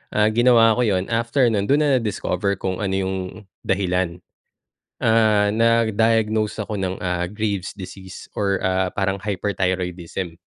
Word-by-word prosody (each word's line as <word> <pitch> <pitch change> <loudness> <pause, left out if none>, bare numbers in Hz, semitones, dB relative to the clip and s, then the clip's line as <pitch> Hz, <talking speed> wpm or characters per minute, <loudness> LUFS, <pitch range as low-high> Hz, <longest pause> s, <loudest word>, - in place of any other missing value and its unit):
ah, 105 +1 +3
ginawa 115 -1 +5
ko 125 - 0
yun 95 -2 +1
after 115 +4 +1
non 100 -2 0
dun 145 +2 +3
na 135 -3 +3
na-discover 100 -2 -1
kung 95 -1 -3
ano 95 -1 -1
yung, 95 0 -1 0.5
dahilan, 90 -2 0 0.9
ah, 110 -2 +3
na-diagnose 110 -1 +2
ako 105 -1 -5
ng 95 0 -2
ah, 90 -1 -1
grave 105 -3 -2
disease 95 0 -10
or 100 -2 0
ah, 95 0 +1
parang 95 -1 -1
hyperthyroidism. 90 -3 -3
100 Hz, 135 wpm, -22 LUFS, 95-110 Hz, 0.9 s, ginawa